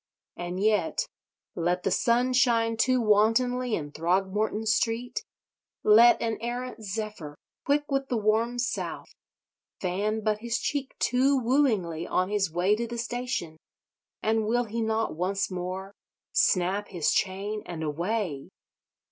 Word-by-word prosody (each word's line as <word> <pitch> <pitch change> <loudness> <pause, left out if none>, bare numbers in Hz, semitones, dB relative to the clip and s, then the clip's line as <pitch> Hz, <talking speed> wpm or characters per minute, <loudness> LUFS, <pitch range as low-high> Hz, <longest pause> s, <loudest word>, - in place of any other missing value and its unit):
And 175 +1 -5
yet—let 180 -3 -1
the 195 - 0
sun 245 +5 +2
shine 230 -2 +3
too 255 +3 +2
wantonly 230 +3 +2
in 145 -2 -5
Throgmorton 195 +7 0
Street, 230 - 0 0.6
let 230 +3 +7
an 225 -2 -2
errant 245 0 -4
zephyr, 205 -7 -5 0.3
quick 290 +1 +2
with 275 0 0
the 245 - 0
warm 220 +3 +1
South, 245 0 -3 0.7
fan 205 +4 -1
but 215 0 +1
his 235 +2 -2
cheek 280 -1 -3
too 265 +3 +2
wooingly 225 - +1
on 185 +1 0
his 200 -3 +1
way 180 +5 +2
to 235 +1 -2
the 235 +1 -6
station; 235 -9 -3 0.7
and 220 0 +1
will 240 +2 +2
he 230 0 -4
not 220 -4 0
once 190 +4 -1
more 185 +2 -5 0.4
snap 190 +3 +2
his 170 -5 0
chain 200 +3 -1
and 165 -2 -5
away? 170 -1 -2
215 Hz, 130 wpm, -27 LUFS, 185-235 Hz, 0.7 s, let